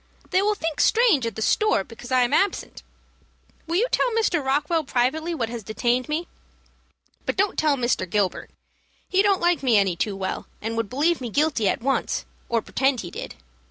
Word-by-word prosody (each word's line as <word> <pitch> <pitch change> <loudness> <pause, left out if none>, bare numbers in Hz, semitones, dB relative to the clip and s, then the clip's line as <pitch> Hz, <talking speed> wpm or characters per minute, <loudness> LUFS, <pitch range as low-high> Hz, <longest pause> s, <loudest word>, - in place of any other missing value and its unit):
They 370 - +3
will 420 +1 +1
think 325 -5 -3
strange 435 - +4
at 225 - -5
the 220 - -2
store 425 - +2
because 235 +4 -12
I 255 -1 +4
am 240 - -1
absent. 395 0 0 0.9
Will 335 - -2
you 425 +7 +3
tell - - +2
Mr. 410 -9 +1
Rockwell 295 +5 +1
privately 295 +6 0
what 230 -7 -2
has 235 -1 -5
detained 240 +5 -1
me; 320 +3 -2 1.0
but - - -1
don't 395 +1 +1
tell 300 -2 +2
Mr. 240 -7 0
Gilbert. 200 -1 -1 0.6
He 380 - +3
don't 400 -2 +3
like 345 -2 +2
me 245 -5 +4
any 195 -3 +2
too 200 +4 -2
well, 190 -1 -4
and 225 +1 -4
would 225 -3 -2
believe 305 +4 +1
me 245 - -4
guilty 280 -5 +1
at - - -1
once, 275 +1 0 0.2
or 230 -3 +1
pretend 265 -2 0
he 175 - -8
did. - - -7
265 Hz, 195 wpm, -24 LUFS, 230-340 Hz, 1.0 s, strange